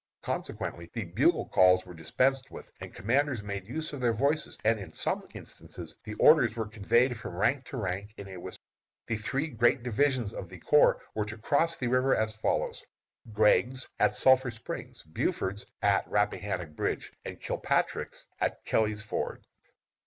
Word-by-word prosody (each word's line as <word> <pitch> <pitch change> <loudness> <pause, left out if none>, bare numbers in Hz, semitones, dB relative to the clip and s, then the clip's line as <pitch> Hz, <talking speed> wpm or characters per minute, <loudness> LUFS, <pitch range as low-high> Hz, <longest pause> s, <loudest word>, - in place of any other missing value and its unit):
Consequently 85 0 -4
the 115 - -2
bugle 85 - +2
calls 90 0 +5
were 90 - -10
dispensed 130 - +1
with, - - -11
and - - -8
commanders 130 +2 0
made 100 -2 -5
use 155 +5 -4
of 140 - -5
their 120 -2 +3
voices, 140 +7 0
and 110 0 +3
in 95 -5 -8
some - - -1
instances 80 -2 -7
the 105 -1 -6
orders 125 -4 +6
were 115 -1 -2
conveyed 115 +4 +2
from 105 - -7
rank 120 +8 +1
to 135 - -7
rank 100 -1 -3
in 100 - -8
a 95 -1 -8
whisper. 85 - -9 0.4
The 115 - -1
three 135 +7 -1
great 120 -6 +2
divisions 125 -2 +1
of - - -7
the - - -10
corps - - +4
were 105 - -1
to 110 +2 -7
cross 160 +8 +1
the 125 - -3
river 130 +2 +3
as 110 0 0
follows: 110 - -1 0.5
Gregg's, 120 +5 +3
at - - +3
Sulphur 130 -1 +5
Springs; 115 -2 -7
Buford's, 95 +5 -2 0.2
at 100 -1 +2
Rappahannock 95 -4 -1
Bridge; - - -2
and - - -7
Kilpatrick's, - - -1
at - - -1
Kelly's 110 -1 +1
Ford. 110 - -4
110 Hz, 165 wpm, -29 LUFS, 100-130 Hz, 0.5 s, orders